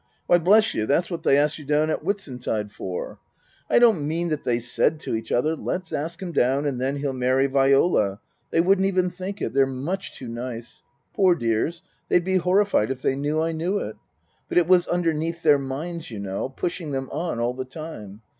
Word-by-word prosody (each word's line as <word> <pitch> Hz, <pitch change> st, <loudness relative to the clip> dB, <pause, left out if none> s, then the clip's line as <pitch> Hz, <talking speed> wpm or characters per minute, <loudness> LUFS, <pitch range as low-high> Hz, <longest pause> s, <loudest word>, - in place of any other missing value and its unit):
" -, -, -42 dB
Why, 175 Hz, -, +5 dB
bless 210 Hz, +6 st, +4 dB
you, 110 Hz, -, -1 dB
that's 170 Hz, +6 st, +1 dB
what 170 Hz, -, -3 dB
they 140 Hz, -, +4 dB
asked 150 Hz, +2 st, +1 dB
you -, -, -9 dB
down 150 Hz, +2 st, +2 dB
at -, -, -1 dB
Whitsuntide 125 Hz, -, -3 dB
for! 95 Hz, -3 st, -6 dB, 0.5 s
I -, -, +4 dB
don't 220 Hz, -12 st, +4 dB
mean 170 Hz, +2 st, -1 dB
that 155 Hz, -2 st, -2 dB
they 120 Hz, -2 st, +1 dB
said 120 Hz, +6 st, +1 dB
to -, -, -4 dB
each 115 Hz, 0 st, -4 dB
other: 155 Hz, +7 st, +2 dB
Let's 185 Hz, +3 st, -4 dB
ask 165 Hz, +4 st, -3 dB
him 185 Hz, -3 st, -5 dB
down 135 Hz, 0 st, +2 dB
and 130 Hz, -4 st, -2 dB
then 135 Hz, +2 st, 0 dB
he'll 140 Hz, -1 st, -2 dB
marry 130 Hz, +1 st, +2 dB
Viola. 135 Hz, -, +3 dB, 0.3 s
They 165 Hz, -, +3 dB
wouldn't 190 Hz, +2 st, +3 dB
even 185 Hz, -2 st, +1 dB
think 190 Hz, +3 st, -6 dB
it -, -, -2 dB
they're 135 Hz, 0 st, +4 dB
much 150 Hz, +10 st, -4 dB
too 130 Hz, -, -8 dB
nice. 120 Hz, 0 st, -6 dB, 0.3 s
Poor 185 Hz, -3 st, +4 dB
dears 115 Hz, +6 st, -1 dB, 0.3 s
they'd 175 Hz, -, +3 dB
be 190 Hz, 0 st, +2 dB
horrified 185 Hz, -, +2 dB
if 135 Hz, -1 st, -4 dB
they 135 Hz, -, +2 dB
knew 145 Hz, +3 st, -1 dB
I 165 Hz, +1 st, 0 dB
knew 170 Hz, +5 st, -1 dB
it! 110 Hz, -, -4 dB, 0.5 s
But -, -, -1 dB
it 175 Hz, -2 st, +4 dB
was 180 Hz, -1 st, +4 dB
underneath 165 Hz, -1 st, -1 dB
their 150 Hz, -3 st, +5 dB
minds, 155 Hz, +5 st, -5 dB
you 110 Hz, -, -7 dB
know, 100 Hz, +4 st, -3 dB
pushing 170 Hz, +4 st, -4 dB
them 135 Hz, 0 st, -2 dB
on 160 Hz, -4 st, -3 dB
all 120 Hz, +1 st, 0 dB
the 130 Hz, +1 st, -4 dB
time. 130 Hz, -8 st, -9 dB
150 Hz, 210 wpm, -24 LUFS, 130-175 Hz, 0.5 s, Why